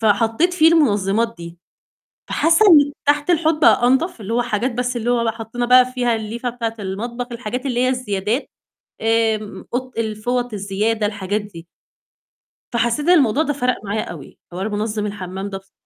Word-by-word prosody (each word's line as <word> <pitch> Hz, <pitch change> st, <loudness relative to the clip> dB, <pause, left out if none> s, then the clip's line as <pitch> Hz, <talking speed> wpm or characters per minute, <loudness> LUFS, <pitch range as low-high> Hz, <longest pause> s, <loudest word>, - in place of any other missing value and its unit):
فحطيت 225 Hz, -, +2 dB
فيه 320 Hz, -2 st, +5 dB
المنظمات 225 Hz, -, +2 dB
دي، 170 Hz, 0 st, -10 dB, 0.7 s
فحاسة 330 Hz, +7 st, +3 dB
إن 290 Hz, -5 st, +6 dB
تحت 290 Hz, +3 st, +1 dB
الحوض 320 Hz, -2 st, +2 dB
بقى 245 Hz, -5 st, +5 dB
أنضف، 265 Hz, -, +1 dB
اللي 215 Hz, +3 st, -4 dB
هو 245 Hz, -, +2 dB
حاجات 240 Hz, +1 st, -1 dB
بس 250 Hz, +1 st, -2 dB
اللي 235 Hz, +1 st, -2 dB
هو 235 Hz, -1 st, +1 dB
بقى 225 Hz, -1 st, 0 dB
حطينا 230 Hz, +2 st, -4 dB
بقى 250 Hz, +1 st, +6 dB
فيها 245 Hz, -2 st, +1 dB
الليفة 230 Hz, +3 st, -4 dB
بتاعة 230 Hz, -2 st, -4 dB
المطبخ، 235 Hz, +6 st, -4 dB
الحاجات 245 Hz, +3 st, -5 dB
اللي 245 Hz, -2 st, -1 dB
هي 255 Hz, -, +2 dB
الزيادات 235 Hz, -1 st, -2 dB, 0.5 s
آمم، 220 Hz, -3 st, 0 dB
قط 255 Hz, +1 st, -4 dB
الفوط 230 Hz, +2 st, -2 dB
الزيادة، 210 Hz, +2 st, -1 dB
الحاجات 205 Hz, 0 st, -2 dB
دي. 175 Hz, -5 st, -12 dB, 1.1 s
فحسيت 235 Hz, +5 st, 0 dB
إن 360 Hz, -, +7 dB
الموضوع 280 Hz, -2 st, +3 dB
ده 290 Hz, -, -1 dB
فرق 250 Hz, -5 st, -1 dB
معايا 205 Hz, +2 st, -2 dB
أوي، 155 Hz, -6 st, -10 dB
حوار 190 Hz, +4 st, -3 dB
منظم 210 Hz, 0 st, -2 dB
الحمام 195 Hz, -1 st, -6 dB
ده 195 Hz, -, -5 dB
بص 195 Hz, 0 st, -26 dB
230 Hz, 170 wpm, -20 LUFS, 210-255 Hz, 1.1 s, إن